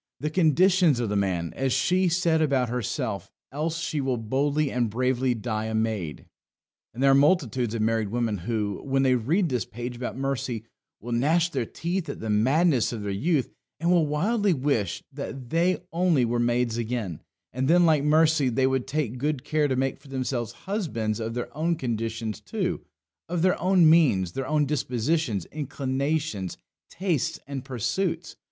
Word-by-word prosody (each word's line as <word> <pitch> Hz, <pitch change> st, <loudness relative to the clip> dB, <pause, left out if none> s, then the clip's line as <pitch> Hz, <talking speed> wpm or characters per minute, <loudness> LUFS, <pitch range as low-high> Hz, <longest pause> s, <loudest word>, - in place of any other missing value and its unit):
The 150 Hz, +1 st, -2 dB
conditions 175 Hz, -2 st, +4 dB
of 120 Hz, -3 st, -1 dB
the 105 Hz, -, -1 dB
man, 90 Hz, -4 st, -1 dB
as 135 Hz, -1 st, 0 dB
she 180 Hz, +9 st, +2 dB
said 165 Hz, -2 st, +2 dB
about 135 Hz, -5 st, +2 dB
herself; 125 Hz, -3 st, -3 dB, 0.2 s
else 155 Hz, +4 st, -2 dB
she 155 Hz, -3 st, -2 dB
will 130 Hz, -2 st, 0 dB
boldly 140 Hz, +6 st, 0 dB
and 120 Hz, -2 st, 0 dB
bravely 125 Hz, +2 st, +1 dB
die 110 Hz, -1 st, -3 dB
a 110 Hz, 0 st, -2 dB
maid. 110 Hz, -8 st, -2 dB, 0.7 s
And 125 Hz, +4 st, -4 dB
there 135 Hz, -, +6 dB
are -, -, +6 dB
multitudes 135 Hz, -, +2 dB
of 110 Hz, -, 0 dB
married 110 Hz, -1 st, +1 dB
women 115 Hz, -3 st, -1 dB
who, 105 Hz, 0 st, -2 dB
when 135 Hz, 0 st, +1 dB
they 130 Hz, -1 st, +4 dB
read 155 Hz, -, +1 dB
this 125 Hz, -6 st, 0 dB
page 120 Hz, +4 st, -6 dB
about 125 Hz, +1 st, -5 dB
Mercy, 130 Hz, -4 st, -2 dB, 0.4 s
will 120 Hz, -, -7 dB
gnash 160 Hz, +8 st, +2 dB
their 125 Hz, -5 st, -2 dB
teeth 175 Hz, +1 st, -3 dB
at -, -, -5 dB
the 110 Hz, -1 st, -3 dB
madness 130 Hz, +5 st, +3 dB
of 110 Hz, -4 st, -5 dB
their 100 Hz, -, -2 dB
youth, 140 Hz, -, 0 dB, 0.3 s
and 170 Hz, +2 st, +1 dB
will 170 Hz, -4 st, +4 dB
wildly 200 Hz, +7 st, +1 dB
wish 130 Hz, -, -1 dB
that 135 Hz, -3 st, -7 dB
they 175 Hz, +3 st, +2 dB, 0.2 s
only 170 Hz, -7 st, +3 dB
were 120 Hz, +1 st, 0 dB
maids 120 Hz, -1 st, +1 dB
again; 110 Hz, -8 st, -3 dB, 0.3 s
and, 130 Hz, +2 st, -1 dB
then, 175 Hz, +3 st, +5 dB
like 155 Hz, -3 st, +3 dB
Mercy, 155 Hz, -2 st, +4 dB
they 130 Hz, +2 st, +1 dB
would 130 Hz, -1 st, 0 dB
take 130 Hz, -4 st, -2 dB
good 145 Hz, -1 st, -1 dB
care 150 Hz, 0 st, +1 dB
to 130 Hz, -, 0 dB
make 135 Hz, +1 st, -1 dB
for 140 Hz, -, -18 dB
themselves 130 Hz, -3 st, -3 dB
husbands 140 Hz, -, -2 dB
of 115 Hz, +1 st, -4 dB
their 120 Hz, +3 st, -5 dB
own 165 Hz, +3 st, +1 dB
conditions 115 Hz, -4 st, -3 dB
too 185 Hz, -5 st, -2 dB, 0.5 s
of 175 Hz, -1 st, -1 dB
their 185 Hz, -1 st, +2 dB
own 180 Hz, -2 st, +5 dB
means, 135 Hz, -, +4 dB
their 135 Hz, +7 st, -4 dB
own 150 Hz, -1 st, +2 dB
dispositions, 130 Hz, -, -1 dB
inclinations, 140 Hz, -, -2 dB, 0.3 s
tastes, 175 Hz, -7 st, -1 dB
and 140 Hz, -1 st, -5 dB
pursuits. 160 Hz, -, -2 dB
135 Hz, 175 wpm, -26 LUFS, 115-160 Hz, 0.7 s, there